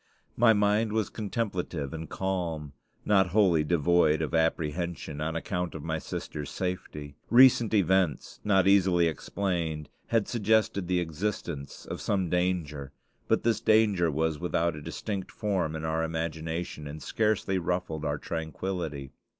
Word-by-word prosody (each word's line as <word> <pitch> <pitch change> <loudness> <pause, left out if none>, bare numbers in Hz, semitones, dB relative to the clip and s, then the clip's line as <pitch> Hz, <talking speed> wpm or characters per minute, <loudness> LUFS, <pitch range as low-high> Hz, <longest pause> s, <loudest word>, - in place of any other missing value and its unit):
My 115 0 +6
mind 105 +1 +2
was 110 -1 0
contemplative 95 - -3
and 80 -2 -6
calm 85 -6 -3 0.3
not 95 -3 +4
wholly 90 -4 +3
devoid 80 0 +3
of 80 - -4
apprehension 80 -1 -1
on 80 +1 -2
account 90 0 -3
of 75 - -6
my 80 -1 -2
sister's 75 -1 -5
safety. 90 -6 -4 0.2
Recent 120 -2 +6
events, 95 -7 +1
not 95 -2 +3
easily 95 -3 +4
explained, 80 -2 -2 0.2
had 115 -3 +1
suggested 110 -4 +1
the 90 0 +2
existence 85 -4 -4
of - - -6
some 95 -4 0
danger; 85 -6 -1 0.4
but - - +2
this 115 -1 +1
danger 105 -6 +4
was 80 0 0
without 85 -2 0
a 75 - -8
distinct 95 +5 -4
form 95 -7 -1
in 80 0 -4
our 80 +1 0
imagination, 80 -1 -3
and 75 +1 -8
scarcely 105 -3 0
ruffled 85 -3 -2
our 75 -1 -1
tranquillity. 80 -3 -4
85 Hz, 140 wpm, -28 LUFS, 80-100 Hz, 0.4 s, My